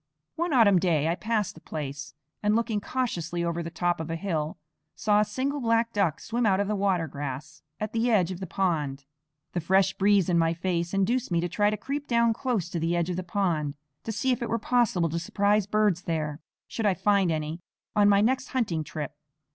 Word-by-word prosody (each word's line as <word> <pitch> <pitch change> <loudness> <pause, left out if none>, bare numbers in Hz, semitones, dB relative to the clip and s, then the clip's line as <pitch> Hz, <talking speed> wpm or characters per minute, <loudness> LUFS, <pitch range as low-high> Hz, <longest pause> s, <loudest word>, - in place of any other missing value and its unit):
One 340 +1 -1
autumn 215 -8 +5
day 165 -4 +2
I - - +2
passed 215 +1 -1
the 160 - -15
place 140 -2 -6 0.3
and, 210 +1 +2
looking 225 -2 0
cautiously 175 -9 -2
over 170 0 -1
the 165 - -5
top 175 0 0
of 160 0 -5
a 165 - -2
hill, 165 -3 -2 0.4
saw 210 -1 +2
a - - +5
single 265 +7 -2
black 230 0 +1
duck 190 -7 +1
swim 235 +1 -2
out 195 -3 +3
of 200 - +1
the 210 - 0
water 190 -4 +1
grass 145 +1 -6 0.2
at 215 +1 -4
the 230 +2 +1
edge 190 -6 +3
of 180 - -6
the 190 - -5
pond. 150 -8 -1 0.5
The 175 - -1
fresh 190 +3 +3
breeze 200 -2 +3
in 170 -2 +3
my 165 0 +2
face 170 +1 -1
induced 230 +6 +1
me 170 -2 +1
to 175 - -1
try 205 +4 +2
to 215 - -2
creep 280 +6 -4
down 235 -1 +3
close 235 -7 -1
to 175 - -3
the 165 +2 0
edge 170 +1 0
of - - -2
the 185 - -2
pond, 170 -6 -1 0.3
to 225 - -3
see 225 +5 0
if 250 - -1
it 235 - -2
were 230 - +1
possible 225 -7 +2
to 165 +2 -2
surprise 205 +4 +1
birds 210 -4 +2
there, 155 -3 -2 0.3
should 225 -2 -1
I 195 - +3
find 195 -1 +2
any 155 +2 -3 0.3
on 205 -1 +5
my 200 0 +5
next 255 +4 +1
hunting 200 - -1
trip. 150 -1 -6
190 Hz, 220 wpm, -27 LUFS, 165-215 Hz, 0.5 s, autumn